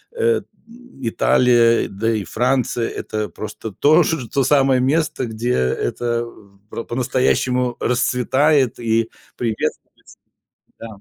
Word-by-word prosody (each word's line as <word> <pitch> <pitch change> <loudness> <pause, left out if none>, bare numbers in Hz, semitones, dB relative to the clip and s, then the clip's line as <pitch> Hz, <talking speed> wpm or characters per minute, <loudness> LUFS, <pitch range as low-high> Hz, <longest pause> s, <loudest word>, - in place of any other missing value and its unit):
э, 465 -1 +1 0.3
м, 245 - -17
Италия, 120 0 +3
да 110 +4 -1
и 105 -3 -2
Франция- 125 +2 0
это 110 -1 -4
просто 110 +1 -7
то 145 +11 +4 0.3
то 135 - +1
самое 135 -1 +3
место, 150 +1 0
где 115 +1 -3
это 115 - -1
в 100 -4 -16
про 115 - -5
по-настоящему 125 0 0
расцветает 130 +2 +1
и 115 -1 0 0.3
приветствуется, 115 -3 -5 0.6
да. 115 - -7
120 Hz, 115 wpm, -20 LUFS, 115-135 Hz, 0.6 s, то